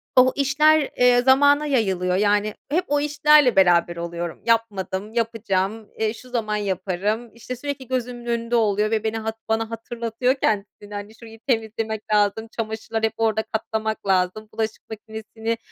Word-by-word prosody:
o 255 0 +6
işler, 295 +2 +3
eee, 245 0 +5
zamana 285 +3 +5
yayılıyor, 190 -10 +1
yani 205 +1 +2 0.2
hep 345 +5 +2
o 290 0 +2
işlerle 295 -3 +4
beraber 175 -2 +4
oluyorum. 170 0 -5
"Yapmadım, 210 -3 0
yapacağım, 220 -2 -1
eee, 220 -1 +1
şu 255 +2 -13
zaman 220 -4 -1
yaparım." 205 +3 -2
işte, 235 +2 -6
sürekli 270 0 -5
gözümün 245 -1 -3
önünde 235 0 -1
oluyor 215 -1 +2
ve 220 -1 0
beni 220 0 -1
hat 220 0 -3
bana 225 0 0
hatırlatıyor 230 +2 -2
kendisini, 205 -4 -2
hani 205 +2 -7
şurayı 225 -1 -13
temizlemek 220 -2 -1
lazım, 210 +2 +2
çamaşırlar 220 0 -3
hep 220 -1 +1
orada 220 -1 +1
katlamak 220 -1 -3
lazım, 190 +3 +1
bulaşık 220 -1 -4
makinesini 220 +1 -5
220 Hz, 150 wpm, -23 LUFS, 210-240 Hz, 0.2 s, o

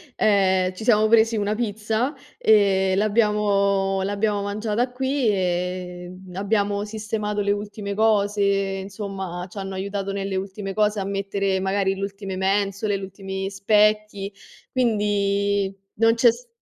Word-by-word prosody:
ehm, 190 -3 +3
ci 185 - -8
siamo 215 -2 +4
presi 225 0 +4
una 205 +1 0
pizza, 220 +4 -1 0.2
ehm, 195 - +4
l'abbiamo 200 -2 +2
l'abbiamo 205 +1 0
mangiata 215 +4 -1
qui 265 0 0
e, 180 -2 -1 0.2
uhm, 180 -1 -11
abbiamo 205 0 0
sistemato 210 -1 -3
le 200 0 +1
ultime 205 0 -4
cose, 205 -1 +2
insomma, 195 -2 -2
ci 200 +2 -9
hanno 195 0 -5
aiutato 200 +1 -3
nelle 195 -1 -2
ultime 195 +1 -5
cose 210 0 +1
a 195 - -1
mettere 195 -1 -1
magari 195 0 0
l'ultime 195 0 -5
mensole, 200 +2 0
l'ultimi 190 0 -5
specchi, 210 0 +2 0.4
quindi 200 -4 +1 0.3
non 225 0 +5
c'è 235 0 +6
s 240 +1 -12
200 Hz, 130 wpm, -23 LUFS, 195-215 Hz, 0.4 s, c'è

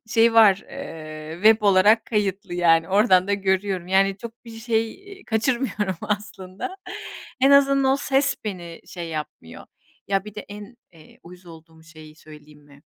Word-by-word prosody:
şeyi 225 +1 +3
var, 205 -4 +5
eee, 155 -1 -8
web 220 +1 +6
olarak 205 +2 +4
kayıtlı. 200 -5 -2
Yani, 165 -2 +3
oradan 190 -2 +3
da 200 - +2
görüyorum. 190 -2 -1
Yani, 195 +1 +2
çok 235 +3 -11
bir 230 - -11
şey, 225 -1 -1
iii, 390 0 -15
kaçırmıyorum 220 -4 -1
aslında. 205 - -5 0.6
En 270 +2 +5
azından 275 -1 +4
ses 275 0 0
beni 175 -5 -7
şey 170 -2 -7
yapmıyor. 150 - -8 0.4
Ya, 195 -1 0
bir 210 -1 -11
de 210 - -6
en, 205 +3 -11 0.2
eee, 160 -2 -19
uyuz 180 +1 -15
olduğum 160 -1 -15
şeyi 155 -2 -15
söyleyeyim 150 -1 -16
mi? 145 0 -20
195 Hz, 155 wpm, -23 LUFS, 170-225 Hz, 0.6 s, web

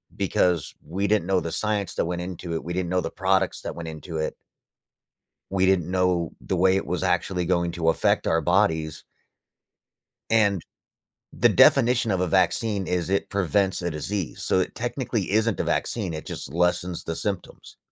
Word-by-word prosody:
because 90 -4 +1
we 95 +6 -2
didn't 100 -4 +1
know 95 -1 +3
the 85 - -4
science 100 +1 -1
that - - 0
went 85 +1 -3
into 90 -2 -5
it, 80 - -3
we 85 - -4
didn't 90 -1 -2
know 90 0 +1
the - - -4
products 95 0 +1
that - - -5
went 85 -1 -6
into 80 +1 -6
it 80 - -2 1.2
We 95 -1 +2
didn't 95 -3 +2
know 90 -3 +1
the 95 - -2
way 95 +2 +4
it 95 - -1
was - - -2
actually 90 -2 0
going 85 -1 +1
to 85 -2 -2
affect 80 - +1
our 80 0 +2
bodies 80 -5 +1 1.3
and 105 -5 +3 0.7
the - - +3
definition 125 -3 +5
of 95 -3 +1
a 90 - +2
vaccine 100 +2 +1
is 90 -1 -1
it 100 - 0
prevents 95 0 +1
a 85 - -1
disease, 90 +4 -4
so, - - +2
it 90 - -1
technically 120 -4 -2
isn't 110 +1 +1
a - - +1
vaccine, 95 -9 -1
it 80 - -7
just - - -6
lessens 90 +1 0
the 80 - -4
symptoms. 100 0 -5
90 Hz, 180 wpm, -25 LUFS, 85-100 Hz, 1.3 s, definition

